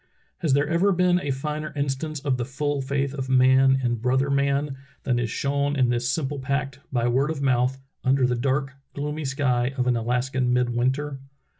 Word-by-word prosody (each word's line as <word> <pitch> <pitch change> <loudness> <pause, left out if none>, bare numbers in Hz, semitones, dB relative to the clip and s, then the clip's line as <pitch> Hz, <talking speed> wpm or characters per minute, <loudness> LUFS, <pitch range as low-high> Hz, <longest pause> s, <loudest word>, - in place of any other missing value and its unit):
Has 160 -6 +1
there 145 +2 +2
ever 170 +5 +2
been 180 -1 +3
a 145 - -4
finer 150 +3 -3
instance 145 +2 -2
of 140 -3 0
the 120 - -1
full 140 +2 -2
faith 140 0 -1
of 135 -2 -4
man 130 +1 +5
in 120 -1 +1
brother 130 +4 +1
man 140 0 +1 0.3
than 125 -3 +1
is 120 -1 -1
shown 140 +4 0
in 130 -3 +2
this 120 0 0
simple 145 0 -2
pact, 140 0 -2
by 120 -2 +1
word 130 +4 +2
of 150 -3 -3
mouth, 130 0 +2 0.3
under 130 0 +3
the 125 - +1
dark, 135 +2 -1 0.2
gloomy 150 +1 -3
sky 130 -1 0
of 125 - +1
an 125 -1 +2
Alaskan 125 +2 0
midwinter? 125 +3 0
135 Hz, 185 wpm, -24 LUFS, 125-145 Hz, 0.3 s, man